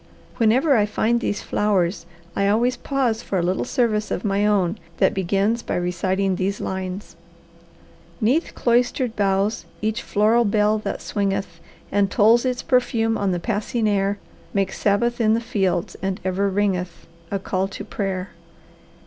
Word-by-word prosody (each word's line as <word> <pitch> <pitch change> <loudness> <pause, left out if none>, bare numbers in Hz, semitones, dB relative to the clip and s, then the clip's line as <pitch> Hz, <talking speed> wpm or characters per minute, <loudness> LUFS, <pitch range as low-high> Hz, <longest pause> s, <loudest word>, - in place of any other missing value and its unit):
Whenever 260 +6 +4
I 210 -2 +3
find 225 +3 +1
these 205 - -2
flowers 190 -4 0 0.3
I 200 - +1
always 235 +5 +2
pause 245 -4 -1
for 195 - -3
a 175 - +1
little 180 +2 0
service 215 -4 0
of 190 - -3
my 200 +1 +2
own 200 -1 +1 0.2
that - - +3
begins 195 +5 0
by - - -3
reciting 185 +2 0
these 195 +2 -1
lines: 190 0 -5 1.0
"'Neath 260 +10 +1
cloistered 240 0 +1
boughs, 200 +1 0
each 220 +3 -1
floral 220 +3 +3
bell 210 0 +2
that - - -4
swingeth 195 -4 -2 0.3
And 200 -1 +2
tolls 230 +3 +4
its 250 -1 -1
perfume 225 -3 +1
on 200 -2 0
the 175 - -1
passing 220 +3 -1
air, 200 0 +1 0.4
Makes 195 -1 0
Sabbath 235 +4 +1
in 220 0 +4
the - - +1
fields, 195 -7 -1
and 190 0 -2
ever 190 +2 +1
ringeth 190 -3 -1 0.2
A 200 - -1
call 190 0 -1
to 195 - -8
prayer." 190 -2 -3
205 Hz, 155 wpm, -22 LUFS, 195-225 Hz, 1.0 s, Whenever